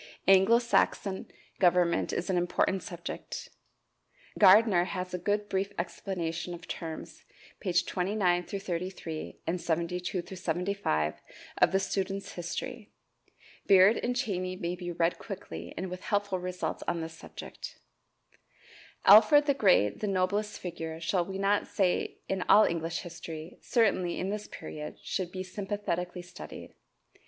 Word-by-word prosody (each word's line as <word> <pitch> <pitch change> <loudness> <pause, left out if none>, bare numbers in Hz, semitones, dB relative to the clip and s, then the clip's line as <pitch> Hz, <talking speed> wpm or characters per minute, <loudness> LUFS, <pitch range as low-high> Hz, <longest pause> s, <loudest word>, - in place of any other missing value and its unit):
Anglo 195 +4 +7
Saxon 210 -4 +1 0.3
government 175 -2 +3
is 175 - -2
an - - +1
important 180 +2 +1
subject. 175 -1 -7 0.9
Gardiner 205 -5 +7
has 180 0 -4
a 180 - -2
good 205 +3 0
brief 195 +1 -1
explanation 170 -1 -3
of 170 +1 -12
terms, 160 -2 -7 0.4
pp. 180 -3 +2
29 180 -1 +1
33, 180 -4 -5
and 175 +2 -1
72 175 +2 -1
75 175 - -1 0.4
of - - +6
the 190 - +3
"Students' 195 0 -2
History." 200 +6 -5 0.8
Beard 195 +3 +7
and 245 +1 -1
Cheyney 185 -7 -1
may 170 +1 -2
be 175 -1 -5
read 170 0 0
quickly 85 - -7
and 185 0 -4
with 180 0 -6
helpful 205 -3 0
results 180 -3 -3
on 170 - 0
this 160 0 -6
subject. - - -9 1.3
Alfred 225 +9 +8
the 285 - +3
Great, 180 - +3
the 210 - -2
noblest 200 +2 0
figure, 165 -2 -5
shall 175 +2 0
we 190 +1 -5
not 200 +1 +1
say 190 -4 0
in 190 -1 -1
all 215 +1 +8
English 165 0 -2
history 165 -1 -8
certainly 200 -7 +1
in 190 +2 -1
this 210 0 -4
period, 150 0 -7
should 185 -3 -2
be 185 0 -4
sympathetically 185 -2 -3
studied. 180 - -10
185 Hz, 135 wpm, -30 LUFS, 170-200 Hz, 1.3 s, Alfred